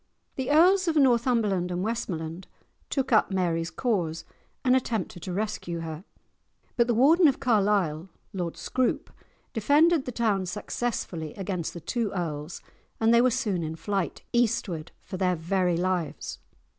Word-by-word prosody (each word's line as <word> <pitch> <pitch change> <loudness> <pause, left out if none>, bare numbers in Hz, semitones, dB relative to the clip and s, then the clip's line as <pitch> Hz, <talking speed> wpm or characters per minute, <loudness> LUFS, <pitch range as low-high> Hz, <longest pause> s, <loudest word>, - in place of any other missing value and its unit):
The 260 0 -3
Earls 365 +5 +5
of 325 - +1
Northumberland 235 - +2
and 180 +1 -2
Westmoreland 180 -6 -4 0.4
took 270 -2 -1
up 215 - +4
Mary's 170 -4 0
cause 170 -6 -1 0.4
and 255 0 +5
attempted 225 -8 -2
to 185 - -5
rescue 180 -4 -3
her, 160 +1 -6 0.7
but 235 -1 +3
the 240 - +1
Warden 315 +8 +6
of 275 - +1
Carlisle, 195 - +1 0.2
Lord 175 -3 -3
Scroope, 255 -1 -1 0.4
defended 290 +7 +3
the 250 - -4
town 210 -5 0
successfully 180 -6 -3
against 185 -4 -4
the 170 - -7
two 230 +3 -2
earls, 160 -3 -4 0.4
and 225 +1 +4
they 235 - +6
were 255 - +4
soon 220 -7 -1
in 160 0 -4
flight, 195 +1 -3
eastward 215 -9 0
for 185 - -6
their 180 -1 +1
very 175 +1 0
lives. 180 -2 -2
200 Hz, 145 wpm, -27 LUFS, 175-240 Hz, 0.7 s, Warden